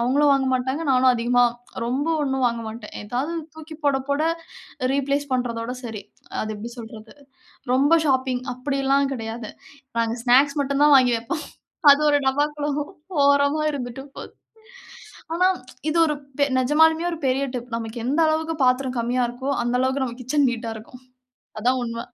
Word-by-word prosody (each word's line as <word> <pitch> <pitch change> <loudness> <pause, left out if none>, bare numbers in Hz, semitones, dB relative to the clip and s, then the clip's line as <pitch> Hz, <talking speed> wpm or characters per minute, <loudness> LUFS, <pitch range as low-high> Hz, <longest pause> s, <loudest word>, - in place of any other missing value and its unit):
அவுங்களும் 280 +5 +3
வாங்க 270 -1 +2
மாட்டாங்க. 260 +5 -1
நானும் 255 0 +5
அதிகமா 245 +1 +2 0.4
ரொம்ப 260 +6 -1 0.2
ஒண்ணும் 265 -2 0
வாங்க 235 -1 -1
மாட்டேன். 220 -1 -9
ஏதாவது 250 +9 -3 0.2
தூக்கி 315 0 -10
போட, 280 -2 +3
போட, 285 +2 +1 0.7
ரீப்ளேஸ் 280 +1 0
பண்றதோட 240 -1 -2
சரி. 220 -3 -6 0.4
அது 215 - -4
எப்டி 230 +3 -7
சொல்றது? 220 -1 -10 0.6
ரொம்ப 285 +6 +4
ஷாப்பிங் 260 -2 +1
அப்டில்லாம் 275 +1 0
கெடையாது. 225 -2 -5 0.5
நாங்க 230 0 +1
ஸ்நாக்ஸ் 275 +4 +4
மட்டும் 280 +1 0
தான் 295 -1 +7
வாங்கி 250 -2 +4
வெப்போம். 265 +8 -4 0.5
அது 280 - +6
ஒரு 290 - +4
டப்பாக்குள்ள 295 +2 0 0.5
ஓரமா 285 +2 +3
இருந்துட்டு 265 -2 -5
போது. - - -9 1.0
ஆனா, 365 +2 +3 0.4
இது 310 - 0
ஒரு 300 - 0 0.4
நெஜமாலுமே 320 +5 +3
ஒரு 330 - -4
பெரிய 265 +2 +1
டிப். 245 0 -5
நமக்கு 230 +1 -5
எந்த 285 +6 +1
அளவுக்கு 320 +1 -1
பாத்திரம் 255 0 +1
கம்மியா 245 +2 0
இருக்கோ, 260 +3 -4
அந்த 240 +1 0
அளவுக்கு 265 +1 +1
நம்ம 240 0 -6
கிட்சன் 280 +2 +2
நீட்டா 230 -1 -4
இருக்கும். 240 +3 -13 0.6
அதான் 250 +4 +2
உண்ம. 230 0 -4
260 Hz, 150 wpm, -23 LUFS, 240-285 Hz, 1.0 s, தான்